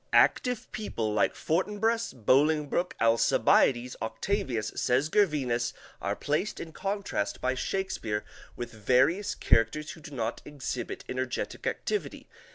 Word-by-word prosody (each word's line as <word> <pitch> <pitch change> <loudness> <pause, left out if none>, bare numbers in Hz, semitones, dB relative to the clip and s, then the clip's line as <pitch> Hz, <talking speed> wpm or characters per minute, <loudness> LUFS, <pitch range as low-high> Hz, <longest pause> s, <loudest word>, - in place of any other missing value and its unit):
_, - - -41
active 250 -3 +3
people, 115 - -2
like 105 - +2
Fortinbras, 210 +7 0
Bolingbroke, 150 - +2
Alcibiades, 120 +2 +3
Octavius, 115 - -1
says 130 +5 +2
Gervinus, 135 - +2 0.3
are - - -1
placed 150 +9 -1
in 160 -1 -7
contrast, 195 - -2
by 130 0 +1
Shakespeare, 130 - -2 0.3
with 120 -1 -5
various 130 - +2
characters 115 +7 +2
who - - -11
do 150 - -9
not 115 -5 -3
exhibit 130 -4 -5
energetic 130 -1 -3
activity. 425 - -3
135 Hz, 120 wpm, -29 LUFS, 120-185 Hz, 0.3 s, active